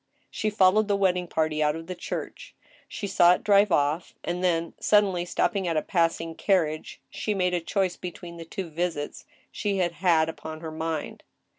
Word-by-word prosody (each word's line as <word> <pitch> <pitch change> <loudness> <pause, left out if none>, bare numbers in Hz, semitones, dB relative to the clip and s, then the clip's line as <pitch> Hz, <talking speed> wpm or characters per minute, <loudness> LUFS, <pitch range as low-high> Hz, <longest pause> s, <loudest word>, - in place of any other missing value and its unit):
She 215 - -1
followed 210 0 +4
the 205 - +2
wedding 180 -2 +1
party 155 -2 0
out 150 0 +2
of 165 0 -7
the 185 - -5
church. - - -6 0.3
She - - -6
saw 175 -3 +5
it - - -9
drive 205 -1 +4
off, 150 +2 +1
and 175 +1 -3
then, 170 -2 +1
suddenly 195 -4 +3
stopping 190 +1 0
a 165 -2 +1
passing 165 -2 0
carriage, 160 -4 0
she 210 - -2
made 180 -2 +1
a 175 - 0
choice 185 +1 -1
between 175 -1 -8
the 165 - -7
two 180 0 -6
visits 160 -2 -3 0.3
she 200 -2 -2
had 175 -2 +1
had 170 -2 +2
upon 160 -1 -7
her 160 -1 -6
mind. 160 -1 -4
175 Hz, 180 wpm, -26 LUFS, 165-190 Hz, 0.3 s, saw